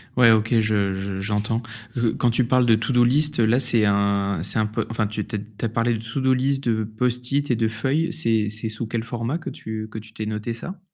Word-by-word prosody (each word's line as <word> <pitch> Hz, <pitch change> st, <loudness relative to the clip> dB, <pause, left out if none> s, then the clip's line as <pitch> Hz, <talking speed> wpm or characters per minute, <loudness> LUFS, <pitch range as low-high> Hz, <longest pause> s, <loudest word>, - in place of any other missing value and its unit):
Ouais 125 Hz, -2 st, +7 dB
OK, 110 Hz, 0 st, +3 dB
je 105 Hz, -3 st, +1 dB
je 95 Hz, 0 st, -4 dB
j'entends 105 Hz, +3 st, -1 dB, 0.3 s
parce 120 Hz, -2 st, 0 dB
que -, -, +2 dB
quand 120 Hz, -, +1 dB
tu 120 Hz, +2 st, +2 dB
parles 125 Hz, +1 st, +3 dB
de 115 Hz, -2 st, +5 dB
to-do 120 Hz, +3 st, +2 dB
list 150 Hz, +4 st, +2 dB
là, 115 Hz, +2 st, +4 dB
c'est 120 Hz, -4 st, +3 dB
un 100 Hz, -2 st, +1 dB
c'est 95 Hz, -, -2 dB
un 110 Hz, -, +2 dB
peu 105 Hz, 0 st, -2 dB
enfin, 110 Hz, -1 st, 0 dB
tu 105 Hz, 0 st, -3 dB
te -, -, -6 dB
tu 105 Hz, -, -2 dB
as -, -, -14 dB
tu -, -, -1 dB
as -, -, 0 dB
parlé 115 Hz, +2 st, +1 dB
de 110 Hz, -, -2 dB
to 115 Hz, +4 st, -3 dB
do-list 130 Hz, +1 st, +1 dB
de 110 Hz, -3 st, +1 dB
Post-it 125 Hz, +5 st, -1 dB
et -, -, +3 dB
de 115 Hz, 0 st, +1 dB
feuilles, 135 Hz, +10 st, -1 dB
c'est 110 Hz, -9 st, +1 dB
c'est 110 Hz, +1 st, -3 dB
sous 110 Hz, +1 st, -4 dB
quel 115 Hz, 0 st, -2 dB
format 120 Hz, +5 st, -3 dB
que 170 Hz, -, -6 dB
tu 110 Hz, 0 st, -6 dB
que 110 Hz, -, -5 dB
tu 110 Hz, 0 st, -14 dB
t'ai 110 Hz, -, -5 dB
noté 105 Hz, +2 st, -3 dB
ça? 180 Hz, +11 st, -7 dB
115 Hz, 260 wpm, -23 LUFS, 110-125 Hz, 0.3 s, Ouais